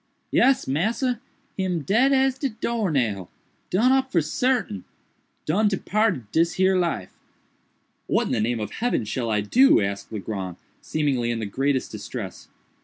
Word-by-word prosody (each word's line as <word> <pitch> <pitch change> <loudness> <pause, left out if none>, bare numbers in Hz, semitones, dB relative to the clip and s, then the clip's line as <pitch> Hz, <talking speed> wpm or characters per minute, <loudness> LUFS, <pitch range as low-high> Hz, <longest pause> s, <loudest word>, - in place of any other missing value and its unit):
"Yes, 270 0 +3
massa, 225 - 0 0.4
him 180 -4 -1
dead 235 - +3
as 265 -1 +2
de 275 - 0
door 225 -2 -2
nail—done 135 - -1
up 265 0 +2
for 175 - +3
sartain—done 190 - -2
departed 205 - 0
dis 165 +1 +2
here 190 0 +3
life." 170 - -1 0.9
"What - - +2
in - - -3
the - - +1
name 110 -1 -1
heaven 240 - -1
shall 115 +2 -2
I 105 -1 +1
do?" 255 - +5
asked 100 +1 -3
Legrand, 95 -4 -5 0.2
seemingly 140 -6 0
in 120 - -1
the 110 - -3
greatest 135 +5 -1
distress. 105 -2 -7
160 Hz, 140 wpm, -24 LUFS, -, 0.9 s, do